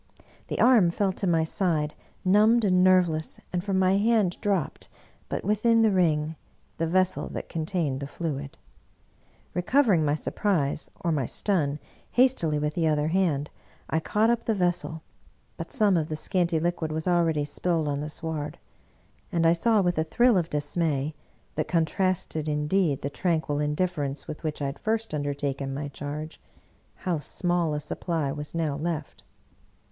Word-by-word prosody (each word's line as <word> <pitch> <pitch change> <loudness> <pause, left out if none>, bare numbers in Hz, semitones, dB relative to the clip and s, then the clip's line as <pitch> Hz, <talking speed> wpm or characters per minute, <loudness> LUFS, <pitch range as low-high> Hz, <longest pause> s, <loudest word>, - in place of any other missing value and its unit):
The - - -3
arm 230 -9 +6
fell 195 +3 0
to 190 +1 -3
my 165 -2 +3
side 160 -3 0 0.3
numbed 215 +4 +5
and 185 -2 +4
nerveless, 180 -4 +3
and 175 -1 -1
from 195 -1 0
my 190 +1 +3
hand 210 -4 +2
dropped, 195 -7 -1 0.4
but - - -3
within 225 +3 +3
the 220 - +4
ring, 160 -4 +1 0.4
the 165 - +1
vessel 185 +2 +1
that - - -5
contained 160 -4 -2
the 140 - -5
fluid. 165 +1 -3
Re 135 - -4
88 140 -1 -9
Bulwer - - -35
Lytton 180 0 -4
covering 220 - +4
my 145 0 +2
surprise 155 -4 -1
or 170 - 0
my 140 -6 0
stun, 150 -8 0 0.4
hastily 245 - +3
with 150 0 -1
the 165 -1 +1
other 150 0 +1
hand 160 -5 +1 0.4
I 160 - +2
caught 215 +7 +2
up 235 - -1
the 225 - +1
vessel, 175 -3 -1 0.5
but - - -7
some 210 -7 +3
of 160 -2 0
the 155 - -2
scanty 170 0 +1
liquid 170 -1 -1
was 160 +2 -2
already 165 -4 +2
spilled 160 +1 -1
on 145 0 -1
the 150 - -4
sward; 155 -2 -4 0.7
and 165 -1 +1
I 165 - +6
saw 215 +5 +3
with 175 -3 +1
a - - +3
thrill 240 +8 +3
of 175 -3 +1
dismay, 150 -1 -1 0.4
that 155 - -1
contrasted 165 -2 0
indeed 150 0 +1
the 140 - -2
tranquil 160 -3 0
indifference 150 -2 -1
with 155 - -7
which 150 -2 -3
I - - 0
had 140 0 -4
first 225 -1 -1
undertaken 140 -2 -2
my 145 +1 -4
charge, 150 +3 -6 0.5
how 175 -4 -2
small 175 0 0
a - - -1
supply 155 -1 -2
was 150 +3 -6
now 160 -4 0
left. 155 0 -4
165 Hz, 170 wpm, -26 LUFS, 150-185 Hz, 0.7 s, arm